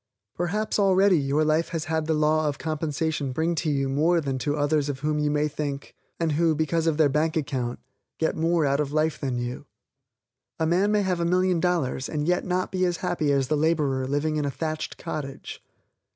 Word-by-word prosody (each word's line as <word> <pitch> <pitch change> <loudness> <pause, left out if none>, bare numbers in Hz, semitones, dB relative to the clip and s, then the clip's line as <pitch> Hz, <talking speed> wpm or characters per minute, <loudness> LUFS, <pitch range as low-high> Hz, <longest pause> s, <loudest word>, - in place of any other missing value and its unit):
Perhaps 210 +6 -1
already 195 -2 +4
your 145 +2 +1
life 155 +2 +1
has 165 -2 -3
had 160 -1 -1
the 160 - +2
law 155 0 +2
of 145 -1 -2
compensation 155 -2 -2
bring 160 +6 0
to 160 -1 -1
you 135 -2 0
more 155 +6 +2
than 135 -4 -2
to 145 +3 -1
others 145 0 +1
of 130 -2 -4
whom 150 0 0
you 150 0 +1
may 150 +1 +1
think, 145 -2 -5 0.3
and 165 -2 +1
who, 160 +1 +2
because 160 +2 0
of 160 -2 +1
their 155 -2 +5
bank 155 +4 0
account, 125 -5 -2 0.4
get 160 - 0
more 165 0 +2
out 140 0 +1
of 145 -2 -1
life 155 +1 0
than 130 -3 -2
you. 120 +1 -5 0.9
A 160 - +2
man 185 +5 +2
may 210 -1 +2
have 185 -2 0
a - - 0
million 180 0 +2
dollars, 165 -7 0
and 150 0 -2
yet 180 +1 +2
not 185 0 -1
be 185 -1 0
as 175 -2 +1
happy 150 -4 0
as 135 -2 +1
the 155 - +1
laborer 145 -4 +1
living 150 +3 0
in 150 - 0
a - - 0
thatched 155 +4 -4
cottage. 150 -5 -6
155 Hz, 210 wpm, -25 LUFS, 145-165 Hz, 0.9 s, their